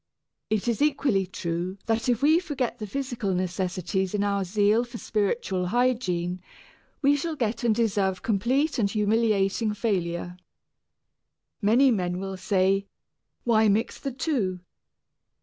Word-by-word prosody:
It 215 +1 0
is 235 +2 0
equally 270 -10 +2
true 175 +1 -3
that 225 +2 0
if 245 +2 +1
we 315 +3 +5
forget 280 -9 -3
the 215 - -5
physical 240 -5 -2
necessities 185 +1 -2
in 205 - +1
our 200 -1 0
zeal 205 +4 +2
for 240 -1 -8
spiritual 200 -4 -1
hygiene, 185 -7 0 0.6
we 280 +1 +5
shall 315 +3 -2
get 230 -3 -2
and 230 -2 +3
deserve 200 -5 0
complete 250 +8 +1
and 200 -3 +2
humiliating 210 0 +1
failure. 180 -5 -2 1.2
Many 240 +6 +5
men 180 -5 -1
will 195 0 -4
say, 195 +1 +1 0.6
"Why 220 -2 +4
mix 215 +3 +1
the 275 - -4
two? 240 - -1
210 Hz, 130 wpm, -26 LUFS, 190-240 Hz, 1.2 s, we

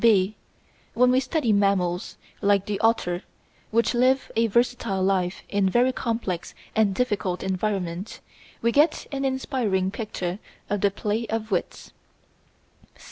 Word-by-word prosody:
(b) 210 -2 +4 0.6
When 250 +2 +5
we 255 - +4
study 255 -3 0
mammals, 195 -3 +1 0.2
like 200 -1 +3
the 205 -1 -2
otter, 200 -6 +1 0.5
which 230 +3 +2
live 255 +2 +2
a 230 +1 +3
versatile 230 -3 +1
life 185 -1 0
in 200 -1 +1
a - - +2
very 245 +5 +3
complex 225 -9 -3 0.2
and 210 -3 +3
difficult 205 -7 -1
environment, 190 -1 -2 0.4
we 235 - +3
get 300 +5 +3
an 275 -1 -2
inspiriting 245 -8 0
picture 190 -4 -4 0.3
of 205 -1 0
the 200 - +4
play 210 +3 -2
of 220 0 -3
wits. 180 - -3
210 Hz, 135 wpm, -25 LUFS, 190-235 Hz, 0.6 s, When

